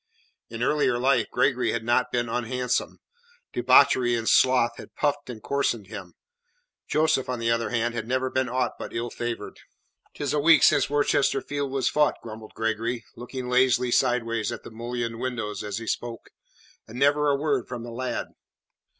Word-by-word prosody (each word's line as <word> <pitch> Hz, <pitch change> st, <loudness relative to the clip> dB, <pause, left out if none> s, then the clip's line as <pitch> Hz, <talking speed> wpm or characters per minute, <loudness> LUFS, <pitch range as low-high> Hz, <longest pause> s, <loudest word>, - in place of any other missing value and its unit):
In 115 Hz, +1 st, -4 dB
earlier 145 Hz, -3 st, +2 dB
life 125 Hz, -2 st, +2 dB
Gregory 125 Hz, -4 st, +1 dB
had 115 Hz, -, -2 dB
not 120 Hz, 0 st, +1 dB
been 120 Hz, -1 st, 0 dB
unhandsome; 125 Hz, +2 st, -2 dB, 0.6 s
debauchery 120 Hz, -2 st, +4 dB
and 115 Hz, -1 st, -3 dB
sloth 120 Hz, -2 st, +4 dB
had -, -, -12 dB
puffed 145 Hz, -2 st, -1 dB
and 110 Hz, -4 st, -8 dB
coarsened 120 Hz, -8 st, -1 dB
him. -, -, -9 dB, 0.7 s
Joseph, 150 Hz, -4 st, +1 dB
on 125 Hz, -, -1 dB
the 115 Hz, 0 st, 0 dB
other 115 Hz, 0 st, 0 dB
hand, 120 Hz, -1 st, 0 dB
had 115 Hz, -2 st, -4 dB
never 130 Hz, +1 st, 0 dB
been 130 Hz, -1 st, 0 dB
aught 125 Hz, -1 st, -1 dB
but -, -, -7 dB
ill 115 Hz, 0 st, -3 dB
favoured. 120 Hz, -1 st, -5 dB, 0.6 s
"Tis 145 Hz, -, -2 dB
a 150 Hz, -, +2 dB
week 160 Hz, +2 st, +6 dB
since 140 Hz, -, +4 dB
Worcester 145 Hz, -1 st, +2 dB
field 145 Hz, -1 st, -4 dB
was 135 Hz, -1 st, 0 dB
fought," 150 Hz, 0 st, +2 dB
grumbled 110 Hz, -1 st, -9 dB
Gregory, 115 Hz, +1 st, -2 dB
looking 125 Hz, +2 st, -6 dB
lazily 125 Hz, -1 st, +3 dB
sideways 120 Hz, -3 st, +1 dB
at 120 Hz, -, -7 dB
the -, -, -10 dB
mullioned 115 Hz, 0 st, -4 dB
windows 120 Hz, -5 st, -3 dB
as 105 Hz, -1 st, -4 dB
he 115 Hz, -, -6 dB
spoke, 115 Hz, +1 st, -4 dB, 0.6 s
"and 115 Hz, -, -10 dB
never 145 Hz, +2 st, +3 dB
a 140 Hz, -, +3 dB
word 140 Hz, -3 st, -1 dB
from 120 Hz, -2 st, -6 dB
the 120 Hz, -, -7 dB
lad." 125 Hz, +2 st, -3 dB
125 Hz, 175 wpm, -25 LUFS, 115-130 Hz, 0.7 s, week